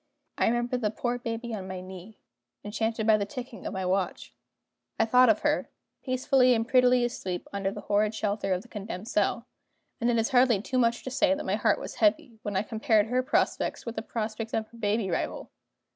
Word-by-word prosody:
I - - +3
remembered 240 +2 0
the 210 - +1
poor 240 +3 -2
baby 230 0 -4
on 195 -3 -5
my 185 -1 -5
knee, 185 +3 -10 0.5
enchanted 220 +1 -2
by 220 -1 +5
the 205 - -1
ticking 245 +1 -7
of - - -5
my 190 -1 -3
watch 185 -8 -1 0.7
I 225 - +4
thought 250 +2 +5
of 215 - +3
her, 295 0 0 0.3
peacefully 255 -1 +3
and 225 0 -1
prettily 250 -1 +4
asleep 185 -7 -4
under 195 -1 -1
the 195 - -7
horrid 210 +1 +1
shelter 205 -2 -1
of 185 +1 0
the - - -17
condemned 210 -2 -7
cell 315 - 0 0.5
and 235 - +1
it 235 - +2
is 225 0 +1
hardly 245 -4 +4
too 255 +5 -1
much 235 -1 +1
to 260 - -5
say 285 +2 +3
that 295 - -6
my - - 0
heart - - +2
was - - -7
heavy, 310 -8 +2
when 205 -1 -4
I 190 - +2
compared 220 -1 +2
her 250 +1 +2
prospects 255 - 0
with 230 -1 -5
the 220 - -2
prospects 225 0 -4
of 220 - -1
her 235 - -16
baby 205 -2 0
rival. - - -3
225 Hz, 210 wpm, -28 LUFS, 205-245 Hz, 0.7 s, by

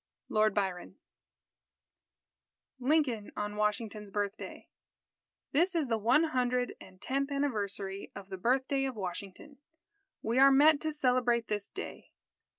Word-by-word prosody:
_ - - -63 0.3
LORD 215 -1 +3
BYRON 190 -3 -2 1.8
LINCOLN 255 -6 +1
ON 210 0 -3
WASHINGTON'S 210 0 -2
BIRTHDAY 205 +1 -4 0.9
_This 345 +6 +3
is 305 -6 0
the 225 -1 +1
one 235 +9 +4
hundred 250 -5 0
and 185 0 -14
tenth 275 +5 -1
anniversary 205 -8 -2
of 195 -1 -9
the 190 - -5
birthday 265 +6 +1
of 265 -2 -3
Washington. 200 +8 -7 0.6
We 230 +3 +1
are 275 +1 +9
met 290 +2 +6
to 315 - -1
celebrate 250 -5 +1
this 205 -1 -2
day. - - -8
235 Hz, 130 wpm, -31 LUFS, 205-275 Hz, 1.8 s, are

